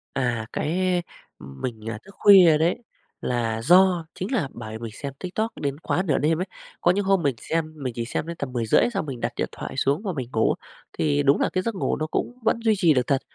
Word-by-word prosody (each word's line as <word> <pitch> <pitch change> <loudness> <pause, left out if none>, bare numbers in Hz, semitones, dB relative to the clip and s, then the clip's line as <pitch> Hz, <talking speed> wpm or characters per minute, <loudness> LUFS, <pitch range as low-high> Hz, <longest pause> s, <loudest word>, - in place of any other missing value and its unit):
À, 120 -4 0
cái 180 +3 0 0.4
mình, 110 - -6
à, 115 - -4
thức 200 - -15
khuya 185 -6 +7
đấy 165 +3 +2 0.4
là 115 -2 -1
do 180 +4 +5
chính 185 +8 -5
là 205 - +1
bởi 110 0 -7
mình 115 -1 -6
xem 140 +3 -6
TikTok 215 +5 -2
đến 140 -1 -2
quá 180 +2 0
nửa 150 -7 +1
đêm 160 +3 +1
ấy. 185 - -1 0.4
Có 175 - +5
những 200 +2 0
hôm 195 -3 +3
mình 140 -4 +1
xem 160 -1 -2
mình 135 -5 -4
chỉ 115 -1 -3
xem 150 - -3
đến 170 - -5
tầm 140 -2 -4
10:30 115 -3 +3
xong 195 -6 -1
mình 130 -4 -6
đặt - - -1
điện - - -2
thoại - - -7
xuống 140 +5 +1
và 190 -5 -2
mình 130 -5 -5
ngủ, 110 - +3 0.4
thì 145 -2 +1
đúng 140 0 +4
là - - +2
cái 185 - +1
giấc 230 - -2
ngủ 185 - -1
nó 155 - -2
cũng 245 +9 -3
vẫn 230 - +2
duy 220 - +4
trì 170 -5 +4
được 125 -3 +1
thật, 135 -1 +2
155 Hz, 240 wpm, -24 LUFS, 125-185 Hz, 0.4 s, khuya